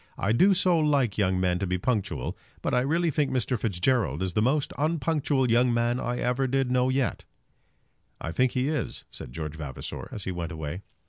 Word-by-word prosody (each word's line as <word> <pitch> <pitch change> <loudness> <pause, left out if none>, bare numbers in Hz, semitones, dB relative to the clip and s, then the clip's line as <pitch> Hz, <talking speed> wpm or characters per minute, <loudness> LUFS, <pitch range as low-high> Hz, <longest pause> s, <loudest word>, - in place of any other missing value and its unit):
"I 100 - 0
do 190 - +5
so 180 -2 +3
like 140 -9 +2
young 95 -2 +2
men 90 -1 +1
to 95 - -1
be 90 +1 0
punctual. 105 0 -1 0.3
But - - -1
I 125 - +4
really 165 +5 +1
think 145 0 +1
Mr. 130 0 0
Fitzgerald 95 - 0
is 95 -2 -2
the 105 - +2
most 135 +5 +1
unpunctual 150 -4 +1
young 120 +1 +4
man 120 +1 +1
I 120 0 -2
ever 125 +2 0
did 135 -1 0
know 125 0 +3
yet." 130 -1 -1 0.9
"I 80 - -4
think 130 +7 +2
he 130 +1 0
is," 150 -5 -3
said - - -8
George 75 +2 -5
Vavasor, 70 -5 -6
as 105 - -6
he 95 - -3
went 85 -1 -4
away. 80 +2 -5
125 Hz, 200 wpm, -27 LUFS, 95-135 Hz, 0.9 s, do